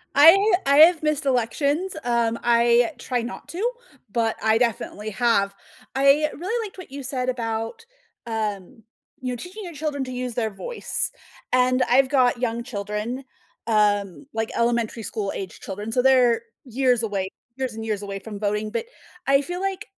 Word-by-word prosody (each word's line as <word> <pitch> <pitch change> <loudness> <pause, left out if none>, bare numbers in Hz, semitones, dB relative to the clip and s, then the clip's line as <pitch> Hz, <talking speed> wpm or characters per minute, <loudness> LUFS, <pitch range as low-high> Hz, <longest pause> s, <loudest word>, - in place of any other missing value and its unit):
I 370 +9 +7
I 280 +1 +4
have 320 +1 +7
missed 305 -1 0
elections, 280 +8 0
um, 235 -1 +1
I 235 +3 +4
try 245 0 -2
not 235 +1 -7
to, 425 +8 -1 0.4
but 225 0 +1
I 220 0 +4
definitely 220 -2 -1
have. 200 -3 +2 0.4
I 275 +3 +4
really 445 +8 -2
liked 390 - -16
what 365 -7 -10
you 280 0 -6
said 255 -1 -2
about, 230 - -3 0.4
um, 215 -2 -4 0.4
you 255 -1 -2
know, - - -3
teaching 365 - -8
your 345 -3 -7
children 295 -2 -2
to 255 - -7
use 250 -1 -3
their 225 -3 0
voice. 475 - -3 0.4
And 255 0 +4
I've 260 +1 +5
got 255 -3 +3
young 235 -1 -1
children, 215 +3 -4 0.4
um, 205 -6 +1
like 225 0 -1
elementary 235 -1 0
school-aged 200 -3 -4
children, 205 +3 -5
so 250 - +2
they're 250 -3 +4 0.2
years 250 -1 +1
away, 195 -3 -2 0.3
years 260 -3 -2
and 225 0 -6
years 210 -2 -2
away 200 -1 -5
from 205 +1 -8
voting, 210 +1 -1
but 460 - -2 0.4
I 275 0 +5
feel 355 +5 -5
like 390 +1 -2
245 Hz, 165 wpm, -24 LUFS, 220-280 Hz, 0.4 s, I